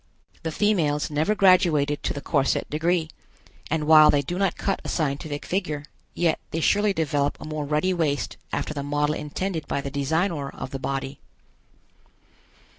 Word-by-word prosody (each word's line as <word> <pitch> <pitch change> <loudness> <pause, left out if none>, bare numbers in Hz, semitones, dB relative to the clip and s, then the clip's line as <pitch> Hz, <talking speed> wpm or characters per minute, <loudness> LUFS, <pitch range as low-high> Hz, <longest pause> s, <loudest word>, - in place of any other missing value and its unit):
The 160 - -3
females 155 -7 +1
never 155 +9 +1
graduated 170 -7 +4
to - - -1
the 145 - -5
corset 140 -3 +1
degree, 165 +2 +1 0.6
and 155 0 0
while 155 -1 +8
they 145 -1 +3
do 175 +7 -4
not 195 -1 +1
cut 195 - -1
a - - -5
scientific 145 -1 -2
figure, 155 -6 -2 0.3
yet 170 -2 +1
they 165 - -2
surely 205 +5 +3
develop 145 -5 0
a - - -8
more 155 -1 -4
ruddy 150 +6 +1
waist 145 - -1 0.2
after - - -2
the 145 - -4
model 145 +1 0
intended 160 +3 -4
by - - -1
the 140 0 -5
Designor 145 +1 -1
of - - -6
the 135 - -4
body. 135 0 -4
155 Hz, 165 wpm, -25 LUFS, 145-175 Hz, 0.6 s, while